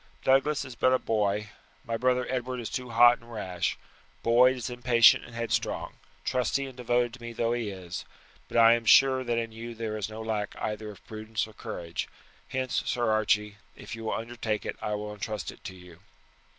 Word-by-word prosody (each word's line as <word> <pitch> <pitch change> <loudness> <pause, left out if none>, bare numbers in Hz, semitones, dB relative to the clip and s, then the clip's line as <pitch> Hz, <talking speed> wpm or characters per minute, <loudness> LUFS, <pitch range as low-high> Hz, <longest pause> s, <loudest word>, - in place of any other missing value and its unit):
Douglas 135 +3 +3
is 130 - -8
but 130 +1 +3
a - - +5
boy; 105 -2 0 0.4
my 115 - -2
brother 125 +1 +2
Edward 125 0 -2
is 115 - -5
too 125 -1 -4
hot 120 +1 +6
and 115 0 -16
rash; 95 -6 -2 0.5
Boyd 125 +3 +5
is 125 - -4
impatient 120 -2 +5
and 115 - -12
headstrong, 115 0 -2 0.3
trusty 125 +2 0
and 135 -2 -9
devoted 120 -1 0
to 130 - -11
me 120 0 -6
though 115 0 0
he 120 -3 -2
is; 90 -3 -6 0.4
but - - -3
I 115 0 +8
am 115 0 -1
sure 130 +3 +6
that 120 -2 -1
in 115 -1 -2
you 115 +1 -7
there 110 -1 -3
is 105 -1 -3
no 110 +1 -7
lack 110 -2 -2
either 105 0 -3
of 105 - -13
prudence 110 0 -3
or 110 - -14
courage. 85 -4 -5 0.4
Hence, 130 -1 -1
Sir 120 -2 0
Archie, 105 -1 +1 0.2
if 105 - -8
you 115 0 -8
will - - -1
undertake 115 -2 -3
it - - -3
I 105 - -1
will 105 0 -5
intrust 105 -1 -4
it - - -18
to 95 - -6
you." 90 -2 -14
115 Hz, 205 wpm, -28 LUFS, 105-125 Hz, 0.5 s, I